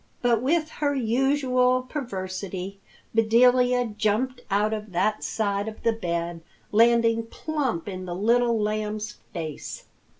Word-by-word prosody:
But 235 Hz, -2 st, +3 dB
with 310 Hz, +4 st, +1 dB
her 285 Hz, -1 st, +2 dB
usual 255 Hz, 0 st, +2 dB
perversity, 195 Hz, -, -5 dB, 0.3 s
Bedelia 245 Hz, +2 st, +4 dB
jumped 220 Hz, +4 st, -1 dB
out 210 Hz, +2 st, +2 dB
of 210 Hz, -3 st, -6 dB
that 215 Hz, +5 st, +1 dB
side 200 Hz, -1 st, -1 dB
of 220 Hz, -, -8 dB
the 230 Hz, -1 st, +3 dB
bed, 170 Hz, -5 st, -3 dB, 0.3 s
landing 230 Hz, 0 st, +4 dB
plump 265 Hz, -, -2 dB
in 185 Hz, -2 st, -5 dB
the 175 Hz, -1 st, -4 dB
Little 235 Hz, +3 st, +2 dB
Lamb's 210 Hz, 0 st, -2 dB
face. 160 Hz, -3 st, -6 dB
225 Hz, 125 wpm, -25 LUFS, 200-250 Hz, 0.3 s, Bedelia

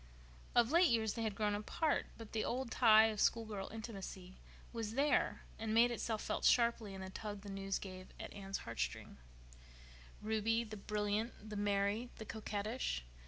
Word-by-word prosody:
Of 240 Hz, +1 st, +5 dB
late 345 Hz, +2 st, +6 dB
years 220 Hz, -2 st, +2 dB
they 230 Hz, -, -4 dB
had 220 Hz, -3 st, -1 dB
grown 210 Hz, -1 st, +1 dB
apart; 280 Hz, +9 st, 0 dB
but 225 Hz, -2 st, -10 dB
the 220 Hz, -, 0 dB
old 250 Hz, 0 st, -2 dB
tie 220 Hz, -2 st, +7 dB
of 210 Hz, -, -2 dB
school 230 Hz, -1 st, +3 dB
girl 205 Hz, -3 st, -5 dB
intimacy 195 Hz, -4 st, -7 dB, 0.3 s
was 225 Hz, -1 st, -3 dB
there, 285 Hz, +2 st, +2 dB, 0.2 s
and 220 Hz, 0 st, -1 dB
made 240 Hz, +1 st, +6 dB
itself 225 Hz, -2 st, -2 dB
felt -, -, -2 dB
sharply 235 Hz, -4 st, +3 dB
in 190 Hz, -, -7 dB
the 190 Hz, 0 st, -6 dB
tug 205 Hz, 0 st, -5 dB
the 200 Hz, 0 st, -8 dB
news 195 Hz, 0 st, -2 dB
gave 185 Hz, -1 st, -8 dB
at -, -, -7 dB
Anne's 195 Hz, -1 st, -4 dB
heartstrings. 115 Hz, -, -4 dB, 1.0 s
Ruby, 220 Hz, +2 st, +1 dB
the 215 Hz, -1 st, -7 dB
brilliant, 210 Hz, +2 st, -2 dB
the -, -, -4 dB
merry, 205 Hz, +3 st, +1 dB
the 220 Hz, -, -8 dB
coquettish! 215 Hz, -, -3 dB
215 Hz, 170 wpm, -37 LUFS, 200-230 Hz, 1.0 s, tie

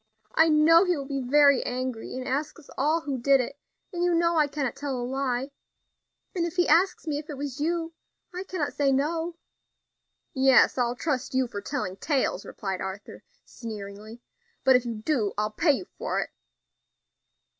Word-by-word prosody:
I 320 Hz, +1 st, +5 dB
know 320 Hz, +3 st, +6 dB
he 360 Hz, -3 st, +1 dB
will 280 Hz, -, -5 dB
be 275 Hz, -1 st, -3 dB
very 280 Hz, +1 st, +5 dB
angry, 250 Hz, -2 st, -4 dB
and 255 Hz, -, -5 dB
ask 290 Hz, +5 st, -2 dB
us 320 Hz, -, -16 dB
all 310 Hz, +5 st, +1 dB
who 280 Hz, -4 st, -3 dB
did 275 Hz, +3 st, +4 dB
it; 250 Hz, -, -4 dB, 0.3 s
and 350 Hz, 0 st, -1 dB
you 355 Hz, -1 st, +3 dB
know 335 Hz, 0 st, +2 dB
I 305 Hz, -2 st, +4 dB
cannot 280 Hz, -3 st, -3 dB
tell 275 Hz, -3 st, -3 dB
a 245 Hz, -, -3 dB
lie, 265 Hz, +1 st, -2 dB, 0.8 s
and 350 Hz, -, -1 dB
if 340 Hz, 0 st, -3 dB
he 355 Hz, -1 st, +2 dB
asks 350 Hz, +4 st, +3 dB
me 295 Hz, -2 st, -1 dB
if 300 Hz, -, -11 dB
it 290 Hz, -, -6 dB
was 280 Hz, -1 st, -5 dB
you, 330 Hz, +2 st, -1 dB, 0.4 s
I 365 Hz, +1 st, -4 dB
cannot 345 Hz, -6 st, -3 dB
say 280 Hz, -2 st, +2 dB
no." 325 Hz, +5 st, 0 dB, 1.0 s
"Yes, 265 Hz, -2 st, +5 dB
I'll 245 Hz, -1 st, 0 dB
trust 260 Hz, -2 st, -2 dB
you 260 Hz, 0 st, +3 dB
for 205 Hz, -4 st, -6 dB
telling 200 Hz, -7 st, -4 dB
tales," 280 Hz, +5 st, -1 dB
replied 190 Hz, -3 st, -4 dB
Arthur, 190 Hz, +1 st, -7 dB, 0.2 s
sneeringly; 215 Hz, 0 st, -9 dB, 0.4 s
"but 265 Hz, -, +6 dB
if 250 Hz, -1 st, +2 dB
you 230 Hz, -, -3 dB
do, 215 Hz, -2 st, -1 dB
I'll 210 Hz, 0 st, 0 dB
pay 300 Hz, +7 st, +3 dB
you 320 Hz, -, -4 dB
for -, -, -1 dB
it." -, -, -6 dB
275 Hz, 185 wpm, -26 LUFS, 250-320 Hz, 1.0 s, know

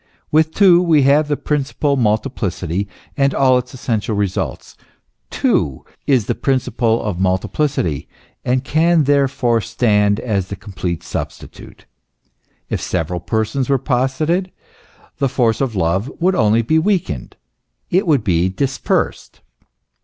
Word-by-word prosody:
With 160 Hz, +1 st, +3 dB
two 180 Hz, -4 st, +6 dB
we 160 Hz, -5 st, +3 dB
have 145 Hz, +3 st, +4 dB
the 145 Hz, -1 st, 0 dB
principle 145 Hz, 0 st, -1 dB
of 140 Hz, -, 0 dB
multiplicity 105 Hz, -, -1 dB, 0.3 s
and 140 Hz, -1 st, +1 dB
all 130 Hz, -2 st, +4 dB
its 125 Hz, +1 st, -9 dB
essential 115 Hz, -4 st, -2 dB
results. 100 Hz, -2 st, -3 dB, 0.5 s
Two 70 Hz, -3 st, 0 dB, 0.2 s
is 130 Hz, -7 st, +3 dB
the -, -, 0 dB
principle 120 Hz, -3 st, 0 dB
of 100 Hz, -5 st, -3 dB
multiplicity, 95 Hz, -, -1 dB, 0.4 s
and 125 Hz, +1 st, 0 dB
can 160 Hz, +2 st, +3 dB
therefore 135 Hz, -4 st, +2 dB
stand 105 Hz, -2 st, +1 dB
as 100 Hz, -6 st, -2 dB
its 100 Hz, -, -5 dB
complete 90 Hz, -4 st, -4 dB
substitute. -, -, -8 dB, 0.8 s
If -, -, -3 dB
several 90 Hz, 0 st, -2 dB
Persons 110 Hz, -, -1 dB
were 135 Hz, -, +3 dB
posited, 140 Hz, +8 st, 0 dB, 0.7 s
the 140 Hz, -2 st, +1 dB
force 120 Hz, -3 st, +1 dB
of 130 Hz, -5 st, -1 dB
love 95 Hz, +8 st, 0 dB
would 185 Hz, +3 st, +2 dB
only 110 Hz, -, +3 dB
be 160 Hz, +8 st, +2 dB
weakened 160 Hz, -, -1 dB, 0.6 s
it 185 Hz, +1 st, +2 dB
would 145 Hz, -8 st, +3 dB
be 90 Hz, -3 st, +1 dB
dispersed. 135 Hz, +7 st, -2 dB
125 Hz, 130 wpm, -18 LUFS, 100-145 Hz, 0.8 s, two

